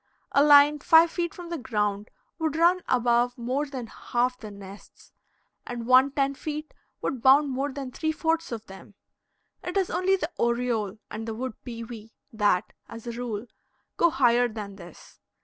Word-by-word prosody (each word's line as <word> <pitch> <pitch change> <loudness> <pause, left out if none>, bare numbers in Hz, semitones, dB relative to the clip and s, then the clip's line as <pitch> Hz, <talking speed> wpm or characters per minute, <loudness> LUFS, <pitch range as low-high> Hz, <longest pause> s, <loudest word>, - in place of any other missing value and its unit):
A 280 - +4
line 295 0 +7
five 325 +3 +6
feet 345 -2 -2
from 350 -1 -10
the 340 -2 -4
ground 210 -3 -2 0.3
would 315 -2 -1
run 345 +3 +4
above 245 0 +2
more 255 +5 -2
than 260 -4 -6
half 245 +2 -1
the 220 -4 -10
nests, 200 0 -13 0.5
and 240 -1 -6
one 255 +2 +6
ten 275 0 0
feet 305 +2 -6 0.3
would 255 - -2
bound 275 +3 +5
more 275 +2 -2
than 270 -1 -6
three 315 +4 -1
fourths 325 0 -1
of 225 -2 -5
them. 195 +1 -13 0.7
It 360 +2 -3
is 380 -2 0
only 380 +1 +2
the 350 -3 -4
oriole 235 -4 0
and 220 +1 -6
the 225 - -4
wood 255 +1 -4
pewee 230 -2 -9 0.2
that, 205 -3 +1 0.2
as 230 0 -10
a 235 - -4
rule, 230 -2 -5 0.5
go 340 - +4
higher 245 -4 +3
than 210 -3 -8
this. 175 -4 -14
250 Hz, 170 wpm, -26 LUFS, 225-295 Hz, 0.7 s, line